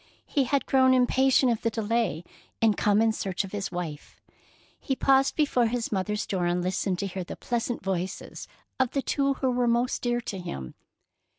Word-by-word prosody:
He 275 -2 +1
had 280 +2 0
grown 260 -1 +4
impatient 260 0 +4
of 230 - -2
the 230 - +1
delay, 220 -6 -1 0.4
and 220 -2 +3
come 210 +1 +3
in 225 - +3
search 195 -3 -2
of 195 - -8
his 205 -1 -4
wife. 170 -5 -6 0.6
He 270 - -2
paused 270 +1 +3
before 265 -6 +2
his 235 0 -2
mother's 210 +1 -1
door 180 -3 -1
and 175 0 0
listened 185 0 -1
to 200 - -2
hear 190 -1 -4
the - - -7
pleasant 240 -2 -3
voices 190 -1 -4 0.3
of 260 -2 +1
the 275 - 0
two 275 -1 +1
who 260 -1 0
were 245 0 +1
most 240 +2 +1
dear 240 -1 0
to 205 -5 -5
him. 70 - -6
225 Hz, 190 wpm, -27 LUFS, 190-255 Hz, 0.6 s, grown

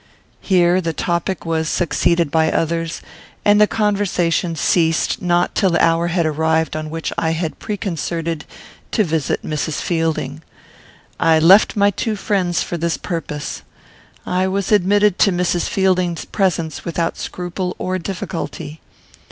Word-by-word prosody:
Here 180 -1 +3
this 165 -2 -3
topic 170 +1 -2
was 160 -1 -1
succeeded 170 -2 +1
by 160 -1 +2
others, 165 0 -2 0.4
and 205 0 +5
the 210 - +6
conversation 195 -6 0
ceased 165 0 +1
not 175 0 +1
till 195 - +2
the 170 - +3
hour 165 +1 +2
had 175 -1 0
arrived 160 +1 +1
on 155 0 -4
which 165 +1 -4
I 165 -1 0
had 165 -1 -3
preconcerted 170 -6 -3 0.5
to 215 - +3
visit 160 -4 -1
Mrs. 155 0 -2
Fielding. 160 -3 -2 0.8
I 165 -1 +4
left 180 +6 +6
my 205 -1 +4
two 215 +3 -2
friends 185 -4 0
for 175 - -4
this 170 0 0
purpose. 150 -3 -5 0.6
I 185 +1 0
was 195 +1 -2
admitted 205 0 +3
to 200 - +5
Mrs. 175 -1 0
Fielding's 185 -3 +1
presence 175 -6 -1
without 165 0 -2
scruple 180 +1 -4
or 185 0 -2
difficulty. 165 -4 -5
170 Hz, 140 wpm, -19 LUFS, 160-185 Hz, 0.8 s, the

